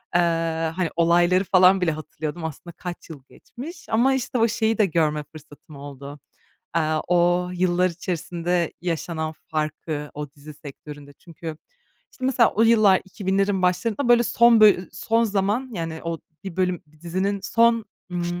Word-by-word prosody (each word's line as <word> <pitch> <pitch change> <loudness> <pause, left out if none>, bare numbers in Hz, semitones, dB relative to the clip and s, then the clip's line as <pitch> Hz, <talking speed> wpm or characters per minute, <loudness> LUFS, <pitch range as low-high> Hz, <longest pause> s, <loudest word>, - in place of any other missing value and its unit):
Iıı, 165 -1 +1
hani, 170 0 -2
olayları 175 +2 +3
falan 185 0 +5
bile 175 -2 +2
hatırlıyordum 155 +1 -6
aslında 160 +2 -7
kaç 175 -1 -8
yıl 145 -5 -10
geçmiş 295 +9 -11
ama, 245 +5 +3
işte, 260 -1 -2
o 230 0 +4
şeyi 225 -1 0
de 215 - +4
görme 155 -4 0
fırsatım 150 0 -15
oldu. 140 0 -9 0.6
Aaa, 155 -1 +1
o 175 0 +2
yıllar 180 0 +2
içerisinde 175 0 -2
yaşanan 165 -2 -3
farkı, 155 -1 -3
o 150 -1 -6
dizi 145 +2 -13
sektöründe 145 -1 -11
çünkü, 165 0 -9 0.6
işte, 255 - -8
mesela 250 -3 +4
o 220 - +2
yıllar 215 -4 +5
2000'lerin 195 0 -1
başlarında, 205 +8 0
böyle, 240 0 +6
son 235 -1 +4
bölü 190 -5 +5
son 230 +1 +1
zaman, 210 +5 -1
yani, 165 -4 -4
o 165 -1 -3 0.3
bir 190 -4 -7
bölüm, 180 -2 0 0.2
dizinin 190 +4 -1
son, 230 +1 +3 0.3
ımm, 175 0 -3
175 Hz, 150 wpm, -23 LUFS, 160-200 Hz, 0.6 s, böyle